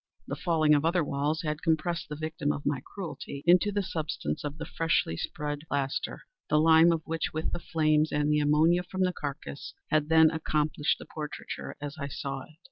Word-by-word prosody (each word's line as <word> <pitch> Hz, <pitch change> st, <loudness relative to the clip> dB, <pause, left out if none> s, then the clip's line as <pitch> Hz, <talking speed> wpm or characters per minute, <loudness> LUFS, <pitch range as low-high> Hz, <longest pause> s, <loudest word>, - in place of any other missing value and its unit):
The -, -, -4 dB
falling 160 Hz, -4 st, +3 dB
of 145 Hz, 0 st, +3 dB
other 170 Hz, +1 st, +2 dB
walls 145 Hz, +3 st, -1 dB
had 150 Hz, 0 st, -2 dB
compressed 165 Hz, 0 st, 0 dB
the 150 Hz, -, -4 dB
victim 155 Hz, -1 st, -2 dB
of 145 Hz, -, -5 dB
my 140 Hz, -3 st, 0 dB
cruelty 165 Hz, -7 st, -7 dB
into 180 Hz, +4 st, +5 dB
the 205 Hz, 0 st, 0 dB
substance 150 Hz, -, -3 dB
of 145 Hz, +1 st, -4 dB
the 160 Hz, -, -5 dB
freshly 165 Hz, -, 0 dB
spread 145 Hz, -, -3 dB
plaster; 140 Hz, -1 st, -2 dB, 0.3 s
the 150 Hz, -, +4 dB
lime 160 Hz, +1 st, +6 dB
of 165 Hz, -2 st, -1 dB
which, 165 Hz, 0 st, -2 dB
with 155 Hz, +1 st, -2 dB
the -, -, -2 dB
flames, 155 Hz, -2 st, +2 dB
and 150 Hz, 0 st, +1 dB
the 150 Hz, -, +3 dB
ammonia 155 Hz, +4 st, +4 dB
from 185 Hz, +1 st, -2 dB
the 180 Hz, -1 st, +1 dB
carcass, 145 Hz, -2 st, -6 dB, 0.2 s
had 155 Hz, 0 st, +2 dB
then 160 Hz, -1 st, +6 dB
accomplished 155 Hz, -2 st, 0 dB
the -, -, -10 dB
portraiture 150 Hz, -1 st, -6 dB
as 145 Hz, +1 st, -6 dB
I 140 Hz, -, -3 dB
saw 135 Hz, 0 st, -4 dB
it. 155 Hz, -, -20 dB
155 Hz, 200 wpm, -29 LUFS, 145-165 Hz, 0.3 s, lime